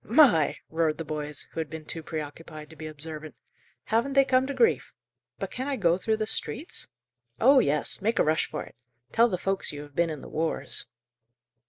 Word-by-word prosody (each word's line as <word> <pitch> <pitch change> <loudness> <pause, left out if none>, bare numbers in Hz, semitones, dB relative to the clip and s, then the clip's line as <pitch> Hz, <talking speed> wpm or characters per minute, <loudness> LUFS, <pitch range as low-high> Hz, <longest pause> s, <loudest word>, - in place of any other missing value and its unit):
"My!" 225 - +5
roared 160 -1 +1
the 165 - -4
boys, 150 -1 -3
who - - -5
had 160 - -2
been 160 -1 -7
too 165 - -3
preoccupied 155 0 -7
to - - -12
be 155 0 -7
observant. 155 0 -8 0.5
"Haven't 235 +5 +1
they 275 0 +6
come 260 0 +3
to 280 - -2
grief!" 460 -1 +2 0.4
"But - - -4
can 260 +2 -3
I 285 - 0
go 175 -8 +3
through 220 +4 0
the 215 - -1
streets?" 265 +8 -3 0.5
"Oh 265 +4 +7
yes! 150 - +2
Make 225 +3 +1
a - - +5
rush 155 +1 +2
for - - -4
it. - - -14 0.4
Tell 235 +1 +5
the 185 - -1
folks 195 +2 -1
you 145 0 -7
have 145 -1 -15
been 170 -1 +2
in 150 -3 -5
the - - -9
wars." 160 +1 -2
165 Hz, 205 wpm, -28 LUFS, 155-230 Hz, 0.5 s, Oh